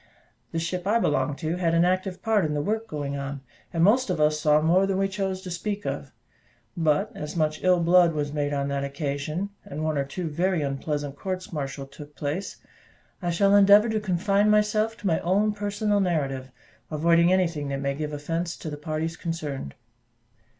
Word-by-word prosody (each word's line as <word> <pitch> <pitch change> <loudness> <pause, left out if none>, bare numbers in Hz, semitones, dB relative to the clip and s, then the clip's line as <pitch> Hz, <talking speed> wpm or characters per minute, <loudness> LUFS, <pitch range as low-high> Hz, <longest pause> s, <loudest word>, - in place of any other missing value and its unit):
The - - -3
ship 175 +3 -2
I 220 +3 +4
belonged 145 - 0
to 160 +1 -2
had 170 -2 +1
an 170 +1 +4
active 185 +1 -1
part 220 -3 +2
in 150 -1 -1
the 145 - 0
work 220 +5 -1
going 145 -4 -4
on, 140 0 -5 0.3
and 165 -1 +1
most 235 +5 +4
of 180 -3 -1
us 150 0 +3
saw 150 0 +4
more 175 +5 +3
than 195 -1 0
we 195 0 +2
chose 190 -1 -3
to 180 - -6
speak 205 +4 -3
of; - - -4 0.6
but 155 -4 +1
as 150 +2 -6
much 155 -1 0
ill 180 -1 +4
blood 170 0 +5
was 145 -1 -2
made 145 -1 -1
on 140 -1 -1
that 140 0 -1
occasion, 145 +6 -3
and 150 +2 -6
one 155 -2 0
or - - +2
two 165 +5 -5
very 175 +1 0
unpleasant 145 +1 -3
courts 185 +2 -5
martial 140 -2 -4
took 145 +2 -13
place, 150 +7 -4 0.6
I 175 - -1
shall 195 +4 +3
endeavour 205 +2 +7
to 220 0 0
confine 200 +1 +2
myself 210 +1 +2
to - - -12
my 165 -4 +2
own 205 +4 +2
personal 205 0 0
narrative, 140 -8 -1 0.4
avoiding 170 +3 +3
anything 170 -6 +1
that 140 0 -2
may 140 0 -1
give 150 +1 -4
offence 165 +3 -3
to 155 - -6
the 150 - -5
parties 155 +2 -3
concerned. 155 - -5
165 Hz, 195 wpm, -26 LUFS, 150-190 Hz, 0.6 s, endeavour